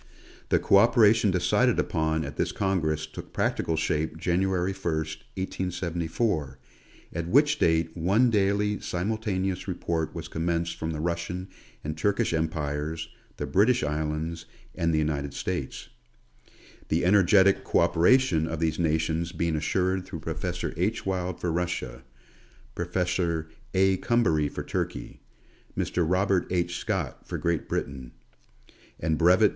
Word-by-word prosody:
The - - +4
co - - +4
operation 110 0 +5
de 90 -1 +1
cided 120 +8 +3
upon 80 -1 0
at 70 - -7
this - - 0
congress 80 -6 0
took 80 - -10
practical 80 - 0
shape 80 0 -1
January 95 +2 0
1, 80 -5 -1 0.3
18*74, 85 - -2 0.6
at 85 0 -3
which 150 - +4
date 80 -1 +2
one 100 +9 +3
daily 105 0 +1
simultaneous 95 -1 -2
report 85 -3 -2
was - - -5
commenced 85 +1 -2
from 80 - -2
the 80 -2 -3
Russian 85 +3 -3 0.3
and 75 0 -3
Turkish 100 +2 +1
Empires, 80 0 -2 0.3
the - - -3
British 115 +4 +3
Islands, 80 +2 -2 0.3
and 85 0 0
the 80 - +1
United 70 -2 -1
States: - - -4 1.0
the 80 +2 +1
energetic 95 0 +5
co - - +2
operation 85 -3 +3
of 80 -1 -4
these 80 -1 0
nations 80 +1 0
being 85 -2 -1
assured 90 +4 0
through 80 -4 -7
Professor 80 +3 -3
H. 100 +6 -1
Wild 90 -2 -2
for 90 - -1
Russia; 80 -8 -2 0.7
Professor 85 -2 -1 0.3
A. 95 0 +4
Coumbary 80 -11 +2
for - - -5
Turkey; - - -4 0.6
Mr. 90 - 0
Robert 95 0 +2
H. 85 -1 0
Scott - - -3
for - - -3
Great 85 -3 -1
Britain; 65 -3 -4 0.9
and 80 -1 0
Bvt. 90 +5 +6
85 Hz, 135 wpm, -27 LUFS, 80-95 Hz, 1.0 s, Bvt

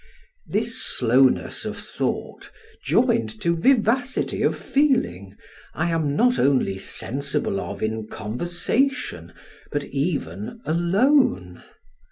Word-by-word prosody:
This - - -1
slowness 130 +3 +2
of - - -5
thought, - - -4 0.3
joined 110 -1 +1
to 170 0 +1
vivacity 250 +5 +1
of - - +1
feeling, 100 - 0 0.4
I 170 +1 0
am 155 -3 0
not 245 +7 +3
only 130 -8 +2
sensible 135 -3 -1
of - - -6
in 110 0 -2
conversation, 175 - -2 0.4
but 145 -1 -1
even 135 - -3
alone. 170 - +2
145 Hz, 100 wpm, -23 LUFS, -, 0.4 s, not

